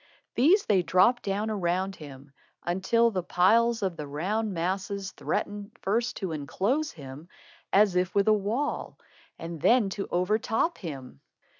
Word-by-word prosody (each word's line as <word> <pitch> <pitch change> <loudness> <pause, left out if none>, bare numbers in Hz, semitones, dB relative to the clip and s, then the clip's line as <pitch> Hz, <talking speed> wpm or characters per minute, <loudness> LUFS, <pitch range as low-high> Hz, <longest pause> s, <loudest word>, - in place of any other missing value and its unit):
These 340 - +4
they 195 -3 +3
dropped 185 +9 +3
down 205 +2 -2
around 190 -1 -1
him, 140 -2 -12 0.3
until 190 +7 +2
the 185 -3 -1
piles 225 +6 +3
of 185 -3 -2
the 150 - -6
round 200 +10 -2
masses 190 +3 -3
threatened 205 +1 -4
first 230 +5 0
to 190 -4 -3
enclose 200 - -1
him 145 +2 -11 0.4
as 200 -1 +4 0.2
with 200 0 +3
a 215 - +6
wall, 215 +8 -2 0.4
and 165 -2 -7
then 235 -5 +4
to 195 0 -4
overtop 215 - 0
him. 135 - -8
195 Hz, 140 wpm, -27 LUFS, 175-220 Hz, 0.4 s, a